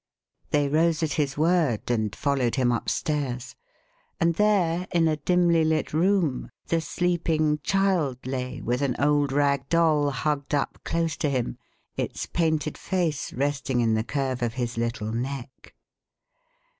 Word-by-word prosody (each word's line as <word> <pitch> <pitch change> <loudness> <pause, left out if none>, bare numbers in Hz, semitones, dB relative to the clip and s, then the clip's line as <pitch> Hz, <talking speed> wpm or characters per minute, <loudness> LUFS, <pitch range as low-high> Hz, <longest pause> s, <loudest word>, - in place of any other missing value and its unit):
They 145 -1 +2
rose 160 +2 +2
at 150 -3 0
his 145 -3 -1
word 155 - +1
and 110 -4 -1
followed 135 -4 0
him 125 -3 +2
upstairs; 125 0 -2 0.6
and 170 0 +3
there, 185 -3 +2
in 165 -1 +3
a 155 -1 +1
dimly 170 +1 +3
lit 155 -1 0
room, 170 -4 +1 0.2
the 165 -1 0
sleeping 160 -2 0
child 185 -7 +1
lay 130 0 -4
with 125 +3 -1
an 135 -3 0
old 145 -1 +2
rag 140 -1 +1
doll 155 -4 +3
hugged 140 +1 -1
up 140 - -2
close 165 -2 -1
to 150 - 0
him, 125 - -2 0.4
its - - -3
painted 160 -3 -1
face 170 -6 -1
resting 140 -1 -1
in 115 -2 +2
the 110 0 +1
curve 130 0 -2
of 120 -1 -1
his 120 -2 -2
little 115 -2 -2
neck. 130 +2 -6
145 Hz, 145 wpm, -26 LUFS, 130-165 Hz, 0.6 s, and